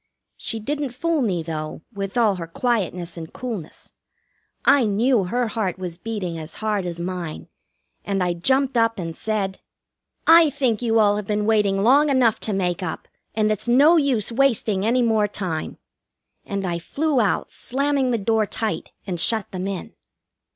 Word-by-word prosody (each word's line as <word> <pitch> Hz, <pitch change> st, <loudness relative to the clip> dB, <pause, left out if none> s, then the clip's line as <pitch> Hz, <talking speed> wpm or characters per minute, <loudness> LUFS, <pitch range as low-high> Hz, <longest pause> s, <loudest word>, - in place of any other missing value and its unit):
She 225 Hz, -, -3 dB
didn't 280 Hz, +2 st, -3 dB
fool 335 Hz, +1 st, 0 dB
me, 185 Hz, -9 st, 0 dB
though, 155 Hz, -1 st, -5 dB
with 195 Hz, +1 st, -4 dB
all 215 Hz, -5 st, +3 dB
her 165 Hz, -2 st, -5 dB
quietness 180 Hz, -4 st, -2 dB
and 160 Hz, -1 st, -7 dB
coolness. 225 Hz, -10 st, -7 dB, 0.7 s
I 280 Hz, -3 st, +6 dB
knew 215 Hz, +1 st, +2 dB
her 240 Hz, +5 st, -1 dB
heart 210 Hz, -6 st, -2 dB
was 180 Hz, -2 st, -6 dB
beating 190 Hz, -7 st, -4 dB
as 155 Hz, +1 st, -7 dB
hard 210 Hz, -4 st, -1 dB
as 170 Hz, -1 st, -5 dB
mine, 175 Hz, -2 st, -5 dB, 0.5 s
and 195 Hz, -2 st, -1 dB
I 175 Hz, -1 st, +1 dB
jumped 265 Hz, +9 st, +1 dB
up 230 Hz, 0 st, +2 dB
and 165 Hz, -3 st, -5 dB
said: 200 Hz, -3 st, -2 dB, 0.7 s
"I 330 Hz, -1 st, +7 dB
think 260 Hz, -6 st, 0 dB
you 225 Hz, -2 st, +2 dB
all 205 Hz, -2 st, +4 dB
have 210 Hz, -2 st, -5 dB
been 210 Hz, 0 st, 0 dB
waiting 205 Hz, -3 st, +2 dB
long 285 Hz, +6 st, +5 dB
enough 255 Hz, -5 st, +3 dB
to 215 Hz, -, -2 dB
make 180 Hz, -2 st, -1 dB
up, 165 Hz, -3 st, -5 dB, 0.3 s
and 215 Hz, -1 st, +2 dB
it's 215 Hz, +2 st, -2 dB
no 280 Hz, +8 st, +6 dB
use 265 Hz, -, +2 dB
wasting 230 Hz, -6 st, +1 dB
any 245 Hz, +2 st, +3 dB
more 220 Hz, -3 st, +2 dB
time." 185 Hz, -6 st, -4 dB, 0.7 s
And 200 Hz, -1 st, -3 dB
I 170 Hz, -1 st, -2 dB
flew 285 Hz, -, 0 dB
out, 210 Hz, -, 0 dB
slamming 275 Hz, 0 st, 0 dB
the 240 Hz, -, +1 dB
door 220 Hz, 0 st, +1 dB
tight, 220 Hz, +1 st, -3 dB
and 180 Hz, -4 st, -4 dB
shut 220 Hz, +3 st, +1 dB
them 185 Hz, 0 st, -4 dB
in. 195 Hz, -2 st, -5 dB
215 Hz, 170 wpm, -22 LUFS, 185-245 Hz, 0.7 s, I